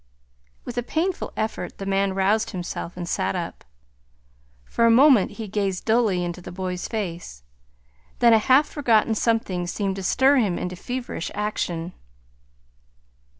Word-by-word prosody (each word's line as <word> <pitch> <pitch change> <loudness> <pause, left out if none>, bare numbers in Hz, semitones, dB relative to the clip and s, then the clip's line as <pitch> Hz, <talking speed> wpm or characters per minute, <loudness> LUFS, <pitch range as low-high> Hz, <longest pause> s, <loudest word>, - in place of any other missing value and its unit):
With 245 0 -3
a - - 0
painful 330 +9 -2
effort 220 0 -3
the 195 - -6
man 195 0 0
roused 200 +3 +2
himself 175 -2 -6
and 175 -1 -5
sat 180 - -1
up. 175 -2 -5 1.0
For 230 - +2
a - - +5
moment 250 -3 +5
he 220 -2 -6
gazed 195 -2 -2
dully 220 -6 +2
into 175 +1 -5
the 180 - -9
boy's 180 0 -4
face; 170 - -5 0.7
then 235 -1 +5
a 220 - +6
half 265 +6 +4
forgotten 230 -6 +2
something 215 -6 0
seemed 195 +1 -2
to - - -4
stir 265 +9 +3
him 205 -8 +1
into 180 0 -4
feverish 245 -1 -5
action. 180 -5 -3
200 Hz, 150 wpm, -24 LUFS, 180-230 Hz, 1.0 s, a